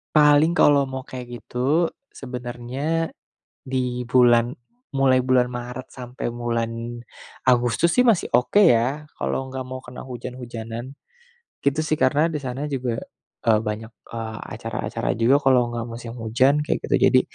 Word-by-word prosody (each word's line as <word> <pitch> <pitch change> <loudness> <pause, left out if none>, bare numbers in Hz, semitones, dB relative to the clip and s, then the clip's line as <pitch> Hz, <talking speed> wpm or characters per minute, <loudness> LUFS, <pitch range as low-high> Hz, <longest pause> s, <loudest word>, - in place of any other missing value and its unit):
Paling 150 +2 +6
kalau 145 -5 +5
mau 130 0 -5
kayak 130 -2 -8 0.2
gitu, 145 +7 +1 0.2
sebenernya 130 +5 -3 0.5
di 125 -2 -2
bulan 120 -1 +5 0.4
mulai 130 -2 +3
bulan 125 -1 +3
Maret 125 +1 -6
sampai 125 0 -6
bulan 115 0 -3 0.5
Agustus 125 +7 +3
sih 250 - +5
masih 225 -7 +3
oke 125 +12 +3
ya, 145 - +3
kalau 135 - -2
nggak 130 0 -5
mau 130 0 -7
kena 125 -1 -10
hujan-hujanan. 120 -1 -7 0.7
Gitu 140 +2 +1
sih, 155 -1 -1
karena 150 +5 +3
di 150 - -2
sana 130 +1 -4
juga, 125 -3 -1 0.5
eee, 110 -2 +4
banyak, 110 +2 -5 0.2
eee, 110 -1 -5 0.2
acara-acara - - -3
juga 125 +5 +5
kalau 130 -2 +5 0.2
nggak 115 - -2
musim 115 0 -7
hujan 130 +6 +2
kayak - - -1
gitu, - - +3
jadi, - - +6
125 Hz, 140 wpm, -23 LUFS, 120-140 Hz, 0.7 s, Paling